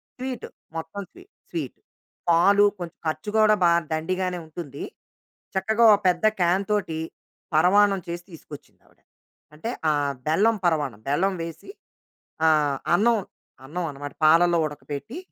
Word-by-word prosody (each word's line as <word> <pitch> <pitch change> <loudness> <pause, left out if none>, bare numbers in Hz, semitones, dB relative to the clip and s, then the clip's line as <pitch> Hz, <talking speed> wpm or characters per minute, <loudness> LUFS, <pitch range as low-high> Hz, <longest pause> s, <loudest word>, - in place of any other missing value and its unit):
Sweet, 255 -1 -5 0.3
మొత్తం 165 +5 -5
స్వీ 360 +1 -15 0.3
sweet. - - -5 0.5
పాలు 195 +5 +5 0.2
కొంచెం 175 -2 -7
ఖర్చు 155 +7 -3
గూడా 215 -1 +5
బా 175 - +6 0.2
దండిగానే 180 +3 -1
ఉంటుంది. 155 -3 -8 0.7
చక్కగా 220 +5 +1
ఓపెద్ద 185 -1 +1
క్యాన్ 180 +3 +2
తోటి, 175 -6 -1 0.6
పరమాన్నం 195 +4 +4
చేసి 170 0 -5
తీసుకొచ్చిందావిడ. 150 -3 -14 0.6
అంటే 160 +10 -5 0.2
ఆహ్, 145 -2 +1
బెల్లం 205 +9 +3
పరవాన్నం. 145 -10 0
బెల్లం 185 +7 +1
వేసి 165 - -9 0.8
ఆహ్, 150 -3 +3 0.2
అన్నం, 230 +5 +3 0.5
అన్నం 170 +5 -4
అన్నమాట. 145 +1 -8
పాలలో 170 +2 +5
ఉడకబెట్టి 150 - -7
175 Hz, 120 wpm, -24 LUFS, 155-200 Hz, 0.8 s, బా